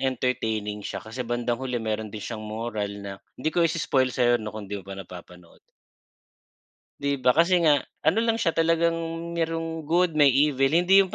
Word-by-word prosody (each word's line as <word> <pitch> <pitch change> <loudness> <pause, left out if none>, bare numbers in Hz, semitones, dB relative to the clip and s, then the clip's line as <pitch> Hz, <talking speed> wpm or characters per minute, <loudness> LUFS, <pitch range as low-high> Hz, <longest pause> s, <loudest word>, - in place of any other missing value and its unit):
entertaining 110 -5 -1
siya - - -6
kasi 115 +4 -7
bandang 120 0 -1
huli 130 -2 -2
meron 110 -1 -2
din 105 0 -8
siyang 110 -2 -5
moral 110 -1 -3 0.2
na 100 - -5 0.2
di 155 +5 -1
ko 175 - +1
i-i-spoil 140 -5 +1
sa'yo 120 -1 +3
na 105 - -5
kung 110 -1 -6
di 100 - -3
mo - - -18
pa 100 - -5
napapanood. 90 -2 -12 1.4
Di 140 0 0
ba, 130 -2 +2
kasi 170 +4 +4
nga 150 -3 +5 0.2
ano 160 +8 +3
lang 230 - +3
siya, 225 -7 +1
talagang 165 0 0
merong 165 -1 -3
good 170 -1 +2
may 140 -3 +6
evil. 135 -1 +3
Hindi 175 +7 +5
yung 190 -2 +3
135 Hz, 185 wpm, -25 LUFS, 110-165 Hz, 1.4 s, may